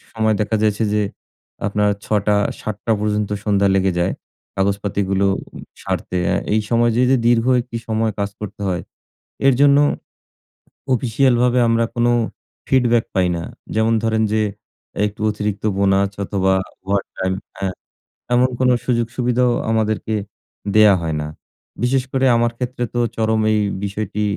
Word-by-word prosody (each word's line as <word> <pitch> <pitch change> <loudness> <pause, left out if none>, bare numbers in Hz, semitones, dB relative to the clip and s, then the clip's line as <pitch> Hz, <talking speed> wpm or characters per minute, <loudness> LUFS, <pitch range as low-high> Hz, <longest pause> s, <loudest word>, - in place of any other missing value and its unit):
সময় 110 -1 +2
দেখা 105 +1 0
যাচ্ছে 110 +1 +1
যে 105 - +2 0.6
আপনার 105 0 +1
৬ঃ০০-৭ঃ০০ 105 +1 0
পর্যন্ত 105 -1 -1
সন্ধ্যা 100 -1 +2
লেগে 95 -1 +2
যায়। 90 +2 +1 0.4
কাগজপাতিগুলো 100 0 0
ও - - -7 0.4
সারতে। 90 - -2 0.4
এই 110 - +3
সময় 120 0 +3
যে, 125 - +3
যে 135 - +5
দীর্ঘ 115 -1 +3 0.2
একটি 120 -1 -7
সময় 110 0 0
কাজ 100 0 -1
করতে 105 -1 -7
হয় 90 -2 -1 0.7
এর 135 - +6
জন্য 140 -1 +6 1.2
অফিসিয়াল 125 +2 +2
ভাবে 125 0 +3
আমরা 115 0 +2
কোন 120 0 +1 0.6
ফিডব্যাক 120 -3 +3
পাই 95 -2 +2
না। 85 - -4 0.3
যেমন 110 +1 +2
ধরেন, 110 -1 +1
যে 110 - +2 0.7
একটু 105 +1 -8
অতিরিক্ত 105 -1 -3
বোনাস 100 0 +2
অথবা 95 -1 +1 0.3
ওভারটাইম 95 -1 -2 0.2
হ্যাঁ, 95 -2 -3 0.6
এমন 125 +1 +4
কোন 130 -1 +3 0.2
সুযোগ 120 -2 +1
সুবিধাও 125 0 +2 0.2
আমাদেরকে 110 0 0 0.6
দেয়া 105 -2 +7
হয় 80 -2 -2
না। 75 - -4 0.6
বিশেষ 130 +1 +2
করে 135 0 +1
আমার 120 0 +2
ক্ষেত্রে 125 0 -3
তো 120 - -1 0.2
চরম 110 0 +1
এই 110 - +2 0.3
বিষয়টি 105 +1 -3
110 Hz, 140 wpm, -20 LUFS, 100-120 Hz, 1.2 s, দেয়া